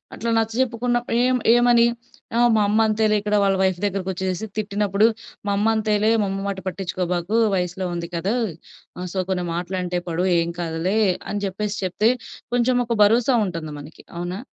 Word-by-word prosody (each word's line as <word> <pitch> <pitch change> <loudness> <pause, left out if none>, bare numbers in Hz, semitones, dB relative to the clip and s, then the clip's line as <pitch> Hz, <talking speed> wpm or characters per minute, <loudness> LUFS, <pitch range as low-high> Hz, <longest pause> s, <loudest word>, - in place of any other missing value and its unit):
అట్లా 235 - -3
నచ్చజెప్పుకున్నప్పుడు 240 +1 0
ఏం 255 0 +2 0.2
ఏమని 240 -1 +5 0.5
ఆ! - - +3 0.2
మా 215 - +3
అమ్మ 215 +2 +2
అంతేలే, 215 0 +2
ఇక్కడ 210 0 0
వాళ్ళ 195 -1 +3
వైఫ్ 185 -2 +1
దగ్గరకొచ్చేసేసి 190 0 -2
తిట్టినప్పుడు, 205 0 +1 0.4
"మా - - +1
అమ్మ 210 +2 +1
అంతేలే 215 0 +1
మా - - +1
అమ్మ 195 0 -3
మాట 195 -1 -3
పట్టిచ్చుకోబాకు 180 +1 -2 0.2
వయసులో 180 0 -2
ఉంది 170 -1 -4
కదా! 180 +6 -1 0.6
ఆ! - - -6
సో, - - -5
కొన్ని 180 -2 -1
మాటలంటే 180 +1 -2
పడు 170 +2 0
ఏం 170 0 -1
కాదులే" 170 +5 -1 0.3
అని 205 0 -2
జెప్పేసి 205 +2 -3
చెప్తే, 210 +5 +2 0.4
కొంచెం 245 +1 +2
ఒక 235 - 0
భరోసా 235 +5 +4
ఉంటంది 165 -4 -5
మనకి. 150 +2 -12
అవునా? 175 +2 -4
200 Hz, 160 wpm, -22 LUFS, 180-220 Hz, 0.6 s, ఏమని